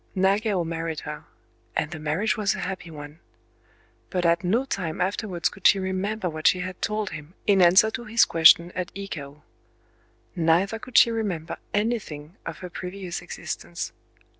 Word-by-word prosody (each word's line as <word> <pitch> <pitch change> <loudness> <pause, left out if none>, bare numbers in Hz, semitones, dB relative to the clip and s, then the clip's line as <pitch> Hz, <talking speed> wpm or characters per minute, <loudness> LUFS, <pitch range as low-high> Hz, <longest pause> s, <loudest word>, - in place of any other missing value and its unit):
Nagao 195 0 +2
married 165 -1 -3
her; - - -7 0.5
and 150 - -1
the 160 - -6
marriage 155 +8 0
was 210 -2 +1
a - - -5
happy 185 -2 -5
one. 150 0 -10 0.9
But 180 -1 -1
at 170 +1 +3
no 225 +9 +1
time 180 -11 -3
afterwards 185 -1 -1
could 195 - +2
she - - +6
remember 190 +2 -2
what 155 -2 0
she 180 - +4
had 185 0 -6
told 215 -1 -1
him 155 +3 -9
in 200 -2 +4
answer 185 +5 +6
to 240 +1 -5
his 225 +2 +4
question 170 +1 +6
at 180 -1 -4
Ikao: 150 -7 -7 0.9
neither 175 +6 +2
could 255 +1 -3
she 235 - +7
remember 195 -8 -3
anything 200 -8 -2
of 165 - -5
her - - -6
previous 185 0 -5
existence. - - -6
185 Hz, 165 wpm, -25 LUFS, 165-205 Hz, 0.9 s, she